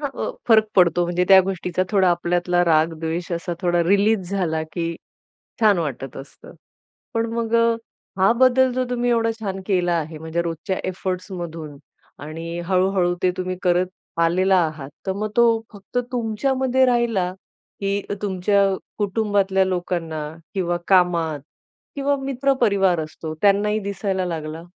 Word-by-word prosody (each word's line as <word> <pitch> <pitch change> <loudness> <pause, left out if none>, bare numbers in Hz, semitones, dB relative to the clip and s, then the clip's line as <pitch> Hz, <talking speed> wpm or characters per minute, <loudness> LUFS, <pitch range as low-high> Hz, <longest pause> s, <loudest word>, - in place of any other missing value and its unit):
हां, 285 - -2 0.2
अ - - -2 0.2
फरक 220 -1 +6
पडतो 175 -1 +4
म्हणजे 175 +1 0
त्या 190 -1 +9
गोष्टीचा 180 -1 -1
थोडा 190 -3 +3
आपल्यातला 175 +1 +1
राग, 160 0 +3
द्वेष 165 +2 -3
असा 170 +1 -3
थोडा 175 -1 +2
रिलीज 200 0 +2
झाला, 165 -5 -1
की 170 -1 -2 0.7
छान 210 -4 +5
वाटत 135 -4 -4
असतं. 135 +1 -12 0.6
पण 230 -1 +1
मग 230 -1 -2
अ, 230 0 +4 0.5
हा 190 +4 +5
बदल 260 0 +5
जो 255 0 0
तुम्ही 245 0 0
एवढा 230 -1 +2
छान 195 -3 -4
केला 180 -3 +1
आहे 160 0 -4
म्हणजे 160 +2 -2
रोजच्या 170 +3 -3
एफोर्ट्समधून 175 -5 -5 0.5
आणि 165 +3 -6
हळू-हळू 185 -1 +2
ते 180 - +4
तुम्ही 185 0 -2
करत 180 0 +2 0.3
आलेला 185 +3 +3
आहात, 150 -3 -6 0.2
तर 190 - 0
मग 210 +1 -2
तो 235 - +7 0.3
फक्त 205 +4 -8
तुमच्यामध्ये 260 +3 +1
राहिला 235 -7 +1 0.5
की 200 0 -1
अ - - -1
तुमच्या 200 0 +2 0.3
कुटुंबातल्या 200 -2 +1
लोकांना 175 -4 -2 0.3
किंवा 175 -3 0
कामात 170 -5 +3 0.6
किंवा 280 0 +1
मित्र-परिवार 240 - +2
असतो 155 +1 -7
त्यांनाही 210 +1 +3
दिसायला 195 -2 -2
लागला? 160 -1 -5
185 Hz, 145 wpm, -22 LUFS, 170-210 Hz, 0.7 s, त्या